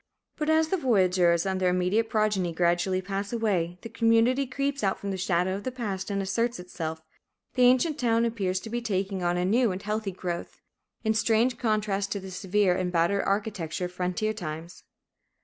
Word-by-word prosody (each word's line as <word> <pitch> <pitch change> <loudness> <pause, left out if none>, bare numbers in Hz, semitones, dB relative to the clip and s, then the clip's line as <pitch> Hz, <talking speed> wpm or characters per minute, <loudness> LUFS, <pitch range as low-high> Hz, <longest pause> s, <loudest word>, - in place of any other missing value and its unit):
But 305 -1 -2
as 315 0 +3
the 380 - +1
voyageurs 185 - +3
and 190 -1 -1
their 180 - +3
immediate 180 +5 +1
progeny 210 -6 +1
gradually 175 +2 +1
pass 195 +1 -3
away, 190 -7 0
the - - -5
community 230 +4 +3
creeps 280 +1 -2
out 195 - +1
from 200 - -4
the - - -2
shadow 185 0 +1
of 200 +1 -4
the 255 - -3
past 210 -7 -4
and 200 -1 -1
asserts 230 +5 0
itself. 160 -3 -6 0.5
The 255 - 0
ancient 260 +5 +3
town 230 -1 +2
appears 195 -5 -1
to 220 - -8
be 240 0 -1
taking 195 -3 -2
on 175 0 +1
a 180 - 0
new 230 +3 +3
and 185 +2 -5
healthy 210 -1 -2
growth, 175 -2 -5 0.4
in 220 -1 +2
strange 225 +3 +2
contrast 210 -3 0
to 200 - -3
the 190 0 -9
severe 190 0 +1
and 180 -1 -1
battered 175 +3 +2
architecture 195 -4 -2
of 180 - -6
frontier 185 +5 -1
times. 165 -3 -7
200 Hz, 190 wpm, -27 LUFS, 180-230 Hz, 0.5 s, as